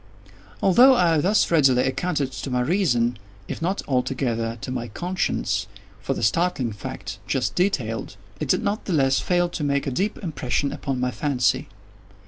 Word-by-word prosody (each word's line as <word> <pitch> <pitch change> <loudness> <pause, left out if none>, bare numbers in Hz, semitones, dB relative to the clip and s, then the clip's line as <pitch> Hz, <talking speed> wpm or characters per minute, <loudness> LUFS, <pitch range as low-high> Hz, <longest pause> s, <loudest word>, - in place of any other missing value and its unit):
Although 250 +8 +7
I 170 -6 +3
thus 190 +7 +2
readily 135 -6 +4
accounted 140 0 -1
to 130 +1 -6
my 125 -1 0
reason, 125 - +1 0.3
if - - -5
not 185 +4 -1
altogether 125 -3 -1
to - - -5
my 120 -2 -3
conscience, 105 - -2 0.3
for 135 - -2
the - - -4
startling 130 - +1
fact 100 - -7
just - - 0
detailed, 115 - -1 0.2
it 150 - -3
did - - +2
not 205 +2 -2
the 190 - -2
less 135 -3 +3
fail 175 -1 +1
to 165 - -4
make 140 -1 0
a 140 - -2
deep 195 - -1
impression 140 -4 -1
upon 135 -3 -3
my 125 0 0
fancy. 130 0 0
135 Hz, 165 wpm, -24 LUFS, 125-175 Hz, 0.3 s, Although